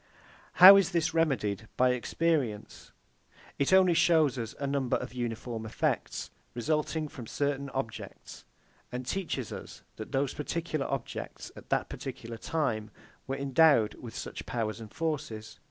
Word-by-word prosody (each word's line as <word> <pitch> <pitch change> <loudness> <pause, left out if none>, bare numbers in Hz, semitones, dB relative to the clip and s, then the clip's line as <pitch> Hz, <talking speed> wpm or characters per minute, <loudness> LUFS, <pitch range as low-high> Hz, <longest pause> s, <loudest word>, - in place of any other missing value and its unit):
How 190 +2 +11
is 195 -2 +2
this 165 -2 +1
remedied 115 -10 0
by 130 0 +4
experience? 125 -3 -1 0.7
It 140 - +2
only 190 -2 +6
shows 160 -5 +4
us 115 -1 -5
a 140 - -2
number 140 -2 0
of - - -7
uniform 120 -1 -4
effects, 110 - -2 0.2
resulting 155 +4 -1
from 125 -5 -9
certain 140 +1 -1
objects, 130 -4 -6 0.5
and 125 +1 -4
teaches 150 - -3
us - - -9
that 110 - -7
those 135 -1 0
particular 155 -1 -3
objects, 135 -3 -5
at - - -13
that - - +1
particular 115 0 -7
time, 110 -8 -1 0.4
were 135 +1 -2
endowed 140 -4 +4
with 115 -4 -10
such - - -6
powers 110 -2 -2
and 110 -2 -10
forces. 140 -9 -4
135 Hz, 140 wpm, -30 LUFS, 115-160 Hz, 0.7 s, How